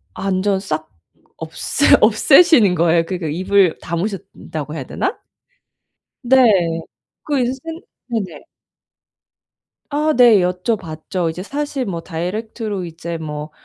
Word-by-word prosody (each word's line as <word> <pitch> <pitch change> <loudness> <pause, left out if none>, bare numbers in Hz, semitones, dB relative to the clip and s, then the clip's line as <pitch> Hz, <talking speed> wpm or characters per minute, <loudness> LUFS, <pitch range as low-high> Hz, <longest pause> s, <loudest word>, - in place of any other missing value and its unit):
완전 195 0 0
싹 155 -5 -4 0.5
없애 - - -2 0.2
없애시는 230 - +5
거예요. 165 0 +3
그니까 180 -3 -4
입을 185 +2 +2
다무셨다고 165 -4 -5
해야 135 - -4
되나? 390 +5 -3 1.1
네. 205 -11 +3 0.4
그 290 -3 -1
인센 255 +2 -1 0.5
네네. 200 -9 -4 1.5
아, 300 +2 +1
네 235 -5 +7
여쭤봤죠. 180 -2 -2
이제 180 +3 -6
사실 285 +1 -3
뭐 170 -4 -4
다이렉트로 200 +4 -4
이제 170 0 -6
뭐 150 -1 -6
185 Hz, 225 characters per minute, -19 LUFS, 165-230 Hz, 1.5 s, 네